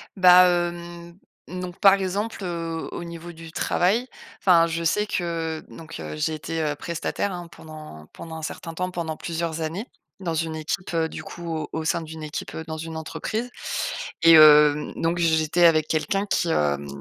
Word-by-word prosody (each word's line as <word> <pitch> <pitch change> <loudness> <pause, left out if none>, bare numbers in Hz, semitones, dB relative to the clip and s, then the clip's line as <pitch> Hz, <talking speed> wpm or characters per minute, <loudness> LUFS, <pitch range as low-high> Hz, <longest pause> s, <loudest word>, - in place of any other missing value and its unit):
Bah 180 -1 +8
hem, 175 0 -3 0.3
donc 180 0 -6
par 195 -2 +7
exemple, 200 +2 -2
heu, 165 -2 -4
au - - -5
niveau 170 0 -8
du 165 -1 -11
travail 205 +10 +1 0.3
enfin 170 -3 +5
je 170 0 -3
sais 210 +6 +2
que 165 -4 -3
donc 160 - -10
heu, 75 -1 -6
j'ai 155 - 0
été, 160 +2 -4
heu, 150 -1 -1
prestataire, 170 +5 -3
hein, 175 -1 -6
pendant 155 - -11
pendant 165 -1 -9
un - - -7
certain 165 +1 -6
temps, 180 +2 -3
pendant 165 -3 -4
plusieurs 165 -1 -3
années. 165 +8 -3 0.3
Dans 175 -4 -3
une 160 0 -2
équipe, 170 +3 -4
heu 165 -1 +2
du - - -7
coup 170 0 -9
au 155 -2 -4
au 160 0 -3
sein 170 +1 +1
d'une 160 -1 -8
équipe 150 0 -6
heu, 160 - -5
dans 160 - -5
une 160 0 -6
entreprise 220 +9 -4 0.7
et 165 - +8
hem, 150 -1 +7
donc 165 +1 -1
j'étais 160 +1 +3
avec 155 -2 +4
quelqu'un 195 +5 0
qui, 175 -3 0
hem, 70 - 0
165 Hz, 185 wpm, -24 LUFS, 160-175 Hz, 0.7 s, Bah